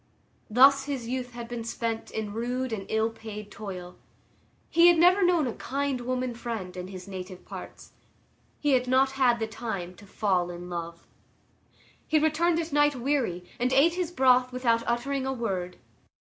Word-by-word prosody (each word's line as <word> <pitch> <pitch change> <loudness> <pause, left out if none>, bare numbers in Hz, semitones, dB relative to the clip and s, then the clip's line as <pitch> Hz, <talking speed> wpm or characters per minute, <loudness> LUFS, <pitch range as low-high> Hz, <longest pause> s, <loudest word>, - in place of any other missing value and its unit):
Thus 270 +4 +6
his 270 -5 -4
youth 250 0 -4
had 235 -1 -7
been 235 -1 -5
spent 230 0 -3
in 215 -2 -4
rude 245 +2 -2
and 195 -3 -5
ill 220 +1 +1
paid 210 -2 -9
toil. 185 -4 -8 0.7
He 340 +1 +5
had 345 -1 +6
never 360 +4 +5
known 350 -4 +3
a 240 - -2
"kind 275 -1 -2
woman 255 0 -2
friend" 230 -6 -5
in 180 0 -6
his 185 0 -9
native 185 -1 -8
parts. - - -10 0.7
He 295 - +1
had 255 -1 +2
not 265 +1 +3
had 255 -3 +3
the 225 - -1
time 210 -5 -5
to 205 - -15
fall 185 -3 0
in 175 +1 -8
love. 170 -1 -6 1.0
He 315 - +3
returned 320 +2 +2
at 325 -2 -4
night 290 0 +4
weary, 245 -9 -1
and 250 +1 +1
ate 280 +6 +5
his 360 -2 -2
broth 255 -4 +4
without 240 -2 +1
uttering 265 +3 -1
a 265 - 0
word. 190 -7 -3
240 Hz, 170 wpm, -27 LUFS, 205-270 Hz, 1.0 s, Thus